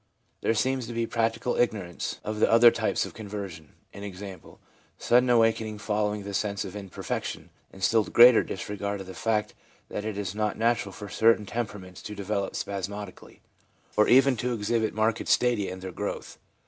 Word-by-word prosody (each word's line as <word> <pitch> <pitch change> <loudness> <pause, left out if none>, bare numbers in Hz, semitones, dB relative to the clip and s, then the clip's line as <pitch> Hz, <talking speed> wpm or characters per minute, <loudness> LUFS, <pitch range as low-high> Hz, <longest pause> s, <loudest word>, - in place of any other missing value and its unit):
There 115 - +1
seems 130 +2 0
to 120 - -6
be 115 0 0
practical 115 +1 -1
ignorance 100 -7 -1
of 105 0 -4
the - - +3
other 115 +1 +8
type - - -1
of - - -9
conversion, 100 -7 -7 0.2
i.e., 100 -2 -8 0.6
sudden 125 +1 +3
awakening 115 -2 +2
follow 105 0 0
ing 105 - -7
the 100 0 -6
sense 100 0 -1
of 95 - -8
imperfection, 100 -3 -5 0.2
and 95 - -11
still 110 +2 +4
greater 120 0 +7
disregard 100 +1 -4
of - - -8
the 95 - -9
fact 110 0 -1 0.4
that 105 - -4
it 110 -2 -4
is 100 -2 -3
not 105 0 -1
natural 115 -3 +1
for 105 +2 -8
certain 110 +1 +3
tempera 105 -1 -4
ments 90 -1 -12
to 105 - -7
develop 100 0 -2
spasmodically, 100 0 -6 0.5
or 105 - +4
even 135 +1 +6
to 125 +3 -1
exhibit 110 0 -1
marked 110 +1 0
stadia 120 -5 +2
in 95 0 -8
their 95 0 -6
growth. - - -5
105 Hz, 175 wpm, -27 LUFS, 100-115 Hz, 0.6 s, other